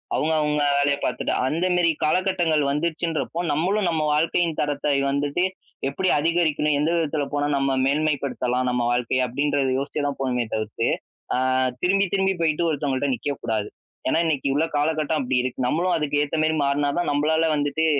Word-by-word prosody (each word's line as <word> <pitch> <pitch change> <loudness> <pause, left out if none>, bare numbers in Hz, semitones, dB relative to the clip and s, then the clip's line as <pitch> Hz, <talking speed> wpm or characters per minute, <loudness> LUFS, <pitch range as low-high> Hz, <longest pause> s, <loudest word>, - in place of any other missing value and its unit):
அவுங்க, 160 +1 +1
அவுங்க 150 0 +1
வேலைய 140 0 +2
பாத்துட்டு. 125 - -1
அந்த 160 +6 0
மேரி 175 -2 +3
காலகட்டங்கள் 170 -2 +1
வந்துருச்சுன்றப்போ, 160 +2 -2
நம்மளும் 180 +6 +1
நம்ம 160 -2 0
வாழ்க்கையின் 165 +1 +1
தரத்தை 145 0 -1 0.2
வந்துட்டு, 145 +4 0 0.5
எப்படி 185 +7 -1
அதிகரிக்கணும்? 155 -2 +1
எந்த 150 +2 +1
விதத்தில 155 -3 0
போனா 145 0 0
நம்ம 135 -1 +1
மேன்மைப்படுத்தலாம் 135 -3 0
நம்ம 125 0 0
வாழ்க்கைய 125 +1 +1
அப்டின்றத 140 +2 0
யோசிச்சு 140 +2 -3
தான் 140 - -3
போணுமே 125 -2 0
தவிர்த்து, 110 +2 -2 0.5
அ - - +1 0.5
திரும்பி, 195 +2 +3
திரும்பி 195 -1 +2
போயி்ட்டு 165 +1 +1
ஒருத்தவங்கள்ட்ட 145 -2 -1
நிக்கக்கூடாது. 115 -4 -3 0.4
ஏன்னா, 160 - +2
இன்னிக்கு 140 -4 0
உள்ள 160 +3 +2
காலகட்டம் 155 +1 0
அப்டி 125 0 0
இருக்கு. 130 0 -2
நம்மளும் 175 +7 +1
அதுக்கு 145 -2 0
ஏத்த 150 - -3
மேரி 155 0 +1
மாறுனாதான் 145 +4 0
நம்பளால 160 +3 +2
வந்துட்டு, 145 +2 0
150 Hz, 155 wpm, -23 LUFS, 140-160 Hz, 0.5 s, மேரி